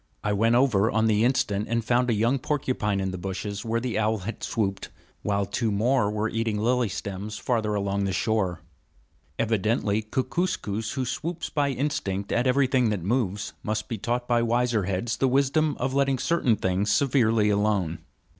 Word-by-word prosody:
I 105 - 0
went 115 +3 +3
over 115 -5 +3
on 110 0 +1
the 110 -1 +3
instant, 105 -5 +1
and 115 -1 0
found 125 +1 +2
a - - +3
young 120 +6 +2
porcupine 125 -8 -1
in 95 -1 -1
the 95 - -5
bushes 95 +2 -4
where 115 0 0
the 120 -2 -2
owl 110 +1 +1
had 100 +4 -6
swooped, 100 -3 -2 0.3
while 100 -1 0
two 110 +2 -1
more 115 +2 +2
were 105 +1 -1
eating 115 -1 -1
lily 120 +1 +1
stems 100 +2 -5
farther 110 -4 0
along 100 0 -1
the 95 - -1
shore. 95 -5 0 0.8
Evidently 110 -1 +1
Kookooskoos, 110 - -2
who 130 -1 -2
swoops 165 +6 -4
by 145 -2 +1
instinct 125 -9 -2
at 120 +2 +1
everything 130 -2 +3
that 100 -5 -2
moves, 105 -1 -1
must 110 0 -2
be 115 - -4
taught 120 +3 -2
by 120 -1 +3
wiser 120 -3 +1
heads 100 +6 -2
the 135 - +2
wisdom 140 +3 +2
of 130 +2 -1
letting 135 -1 +2
certain 130 -5 +2
things 95 +1 0
severely 115 -6 +3
alone. 100 -5 0
110 Hz, 175 wpm, -26 LUFS, 100-125 Hz, 0.8 s, went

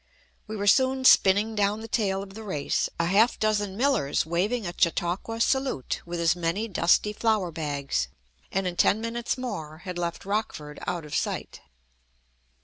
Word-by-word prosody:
We 215 - -5
were 200 - -2
soon 260 +4 +3
spinning 205 0 +5
down 210 0 0
the 225 - -7
tail 195 -4 0
of 195 -1 -12
the 220 - -8
race, 170 -10 -1
a 170 - +2
half 205 +7 +3
dozen 205 -2 0
millers 245 - +1
waving 195 +8 -1
a 175 - -4
"Chautauqua 175 +6 0
salute" 265 - 0
with 170 0 -4
as 170 0 +3
many 175 +6 -1
dusty 195 +2 +2
flour 215 -5 +1
bags, 140 - -2 0.4
and 195 0 -1
in 180 -1 -3
ten 210 - +4
minutes 230 +2 -2
more 160 -11 -6
had 180 -2 -4
left 170 +1 -3
Rockford 195 -8 -3
out 175 -3 -2
of 150 - -10
sight. - - -3
195 Hz, 165 wpm, -26 LUFS, 170-220 Hz, 0.4 s, spinning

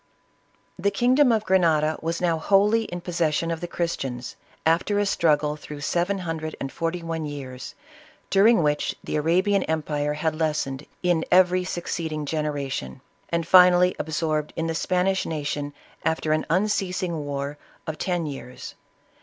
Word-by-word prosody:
The 200 +3 +2
kingdom 255 +4 +4
of 220 -2 +2
Grenada 160 -5 +3
was 165 +1 -2
now 170 -2 +1
wholly 205 +6 +3
in 175 -3 -6
posses 170 -3 0
sion 165 +2 -1
of 165 - -3
the 175 - -3
Christians, 135 -8 -3 0.3
after 170 +6 +2
a 205 - +2
struggle 150 -5 +2
through 150 -1 -9
seven 175 +7 0
hundred 160 -3 -4
and 135 - -4
forty 165 +1 -3
one 165 -1 -3
years, 130 -3 -7 0.6
during 205 0 +5
which 150 0 0
the - - -2
Ara 165 +5 +2
bian 200 -1 +2
empire 150 -2 -1
had 160 +1 0
lessened 150 -3 -2 0.2
in 175 -2 +2
every 180 0 +5
succeeding 165 -4 -3
genera 150 -2 -2
tion, 65 - -5 0.3
and 170 -1 -1
finally 180 0 +6
absorbed 155 -1 -1
in 165 - -2
the 165 - -1
Spanish 185 +3 0
nation 145 -2 -3 0.3
after 160 -1 0
an 155 0 +1
unceasing 185 -3 0
war 140 0 -4 0.3
of 155 -1 -5
ten 175 -3 -1
years. 135 -3 -7
165 Hz, 155 wpm, -24 LUFS, 150-180 Hz, 0.6 s, finally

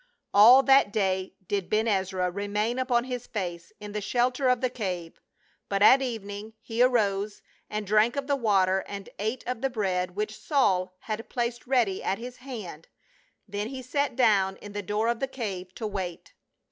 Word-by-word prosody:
All 235 +7 +8
that 270 -6 +5
day 190 -3 -1
did 200 -3 -2
Ben 215 +1 +1
Ezra 190 -3 0
remain 205 +5 -1
upon 250 -2 +2
his 250 -1 -5
fece 175 -5 -5
in 210 0 -8
the 210 0 -3
shelter 250 +5 +1
of 250 -1 +3
the 255 0 0
cave, 180 -8 -5 0.5
but 200 0 +1
at 265 +5 +8
evening 215 -3 -5
he 225 +1 -3
arose 210 -5 +1 0.3
and 210 0 -3
drank 215 +4 +3
of 280 -1 -2
the 285 0 +1
water 190 -6 +2
and 200 -1 -7
ate 220 +5 -2
of 250 -2 -3
the 270 - +1
bread 185 -6 -1
which 215 +1 -3
Saul 185 - +1
had 220 +1 -5
placed 240 -1 -3
ready 240 -8 +1
at 195 - 0
his 245 +1 -8
hand, 215 - -8 0.6
then 205 +1 -3
he 260 +1 -7
sat 280 +1 -1
down 200 -6 +3
in 205 - -10
the 205 0 -4
door 210 +3 -1
of 235 -1 0
the 270 - -1
cave 195 -8 -5
to 225 - -5
wait. 190 -5 -5
215 Hz, 185 wpm, -27 LUFS, 195-245 Hz, 0.6 s, All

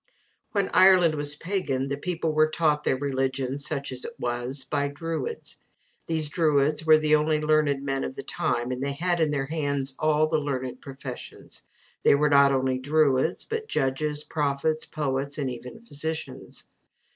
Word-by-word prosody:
When 200 -2 +1
Ireland 185 -3 +6
was 145 -1 -1
pagan 155 -7 -2
the 140 +1 -2
people 165 +2 -2
were 155 0 +3
taught 150 -2 +1
their 130 - +1
religion, 135 -1 -2
such 145 -1 -2
as 130 -1 -4
it 235 - -5
was, 120 +3 -3
by 140 +1 -1
Druids. 165 - -5 0.5
These 160 -2 +3
druids 150 -1 +1
were 155 0 +8
the 155 0 +1
only 155 0 +1
learned 150 -2 +2
men 135 -1 -1
of 65 - -5
the - - -6
time, 120 +1 -2
and 125 0 -4
they 140 0 -1
had 175 +4 0
in 160 -2 +2
their 140 -2 -1
hands 140 -3 -2
all 155 0 +3
the 155 - +1
learned 130 -3 -4
professions 135 -2 -9 0.4
they - - +5
were 150 +1 +2
not 140 -1 +6
only 130 -1 0
druids, 145 +2 +1
but 445 -1 -4
judges, 150 - -1
prophets, 150 +1 -1
poets, 140 -1 -2
and 135 -3 -2
even 125 - -9
physicians. 155 - -6
145 Hz, 170 wpm, -26 LUFS, 135-155 Hz, 0.5 s, were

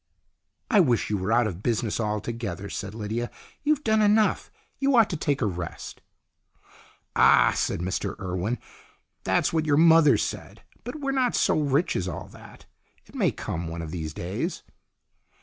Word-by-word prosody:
" - - -18
I 215 - +5
wish 125 - +2
you 105 - +1
were 95 +4 -2
out 120 +1 +4
of 95 -4 -4
business 115 -1 -1
altogether," 105 -2 -3
said 100 +1 -5
Lydia. 115 +2 -3 0.3
"You've 300 0 +1
done 220 -1 +2
enough. 210 +1 +2 0.3
You 275 -1 +2
ought 225 -3 +5
to - - -1
take 145 -4 -1
a - - +2
rest." 90 -4 -6 1.1
"Ah!" - - +5
said - - -1
Mr 95 +2 -2
Urwen. 95 +6 -2 0.7
"That's - - +1
what 160 -1 0
your 145 -1 +3
mother 160 -2 +6
said. - - -5 0.2
But 290 +5 -7
we're 275 -1 -1
not 260 -3 +1
so - - +2
rich 145 +3 +1
as 95 - -1
all 85 - -6
that. - - -15 0.4
It - - -20
may - - +2
come, 80 +1 -5
one 85 0 -5
of 80 - -7
these 80 -3 -4
days." 90 +5 -4
115 Hz, 170 wpm, -26 LUFS, -, 1.1 s, mother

